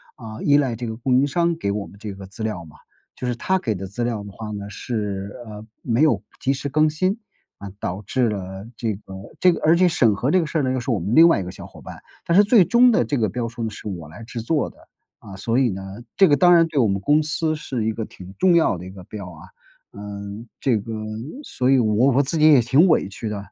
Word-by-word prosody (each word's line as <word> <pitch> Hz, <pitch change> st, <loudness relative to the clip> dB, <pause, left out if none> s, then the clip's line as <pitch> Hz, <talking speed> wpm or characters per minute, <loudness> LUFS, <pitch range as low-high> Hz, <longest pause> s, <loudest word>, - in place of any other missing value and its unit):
啊， 110 Hz, -2 st, -9 dB
依 145 Hz, -, +3 dB
赖 135 Hz, -5 st, +2 dB
这 120 Hz, -1 st, -5 dB
个 110 Hz, -, -4 dB
供 125 Hz, +2 st, +1 dB
应 140 Hz, -, +2 dB
商 170 Hz, +3 st, +1 dB
给 100 Hz, -, -2 dB
我 105 Hz, -1 st, -3 dB
们 100 Hz, -, -15 dB
这 105 Hz, -2 st, -6 dB
个 95 Hz, 0 st, -10 dB
资 100 Hz, +4 st, -11 dB
料 105 Hz, -6 st, -3 dB
嘛， 80 Hz, -, -15 dB, 0.4 s
就 125 Hz, -, -4 dB
是 120 Hz, -, -1 dB
他 190 Hz, +10 st, 0 dB
给 110 Hz, -8 st, -2 dB
的 95 Hz, +1 st, -6 dB
资 100 Hz, +5 st, -4 dB
料 110 Hz, -4 st, -3 dB
的 100 Hz, -, -9 dB
话 110 Hz, +1 st, -8 dB
呢， 100 Hz, -1 st, -6 dB
是， 100 Hz, -2 st, -4 dB
呃， 105 Hz, 0 st, -9 dB, 0.2 s
没 120 Hz, +3 st, 0 dB
有 155 Hz, -, +3 dB, 0.2 s
及 135 Hz, -, +1 dB
时 140 Hz, +1 st, -4 dB
更 155 Hz, +2 st, +3 dB
新， 185 Hz, +8 st, -1 dB, 0.4 s
啊， 100 Hz, -, -7 dB
导 95 Hz, +4 st, -4 dB
致 125 Hz, +1 st, +1 dB
了 95 Hz, 0 st, -6 dB
这 110 Hz, -3 st, -1 dB
个 95 Hz, -1 st, -13 dB, 0.3 s
这 180 Hz, 0 st, +5 dB
个 -, -, -3 dB
而 160 Hz, +2 st, +5 dB
且 180 Hz, 0 st, +4 dB
审 115 Hz, -, +3 dB
核 130 Hz, +8 st, -1 dB
这 185 Hz, -, +4 dB
个 165 Hz, -, 0 dB
事 160 Hz, -, -3 dB
儿 -, -, 0 dB
呢， 130 Hz, -, 0 dB
又 130 Hz, -, -1 dB
是 120 Hz, -, -6 dB
我 115 Hz, -, +1 dB
们 100 Hz, +7 st, -3 dB
另 165 Hz, +1 st, +9 dB
外 165 Hz, -, +3 dB
一 -, -, -3 dB
个 90 Hz, -, -7 dB
小 -, -, -10 dB
伙 -, -, -15 dB
伴， -, -, -10 dB, 0.3 s
但 170 Hz, -, +1 dB
是 205 Hz, -, +8 dB
最 210 Hz, -1 st, +5 dB
终 245 Hz, +1 st, +5 dB
的 235 Hz, +2 st, +3 dB
这 145 Hz, -, -1 dB
个 110 Hz, -2 st, +1 dB
标 120 Hz, +3 st, -3 dB
书 115 Hz, 0 st, -7 dB
呢， 110 Hz, -, -1 dB
是 105 Hz, 0 st, -9 dB
我 85 Hz, -6 st, -6 dB
来 90 Hz, +9 st, -11 dB
制 115 Hz, 0 st, -6 dB
作 150 Hz, +5 st, 0 dB
的。 -, -, -27 dB, 0.4 s
啊， 100 Hz, -, -11 dB
所 115 Hz, +5 st, 0 dB
以 130 Hz, -, +3 dB
呢 95 Hz, -1 st, -5 dB, 0.3 s
这 190 Hz, -4 st, +5 dB
个 145 Hz, -, +4 dB
当 175 Hz, +3 st, +6 dB
然 165 Hz, -1 st, +5 dB
对 150 Hz, -3 st, -1 dB
我 115 Hz, -, +4 dB
们 100 Hz, 0 st, -1 dB
公 150 Hz, +8 st, +3 dB
司 155 Hz, +1 st, -1 dB
是 135 Hz, -7 st, -4 dB
一 110 Hz, -, 0 dB
个 110 Hz, 0 st, -4 dB
挺 95 Hz, +1 st, -12 dB
重 180 Hz, -2 st, +4 dB
要 160 Hz, -, +3 dB
的 90 Hz, -, -9 dB
一 90 Hz, -, -8 dB
个 95 Hz, -1 st, -11 dB
标 95 Hz, -1 st, -8 dB
啊， 80 Hz, -3 st, -13 dB, 0.4 s
嗯， 100 Hz, +2 st, -8 dB
这 125 Hz, -5 st, +2 dB
个 110 Hz, +2 st, -6 dB, 0.5 s
所 125 Hz, -, -1 dB
以 135 Hz, -, +5 dB
我 115 Hz, +2 st, +3 dB
我 140 Hz, +3 st, +3 dB
自 160 Hz, +5 st, -2 dB
己 155 Hz, -, +4 dB
也 140 Hz, -5 st, +7 dB
挺 135 Hz, +10 st, +4 dB
委 155 Hz, -, +2 dB
屈 110 Hz, -, -6 dB
的， 105 Hz, -1 st, -3 dB
115 Hz, 295 characters per minute, -22 LUFS, 100-150 Hz, 0.5 s, 另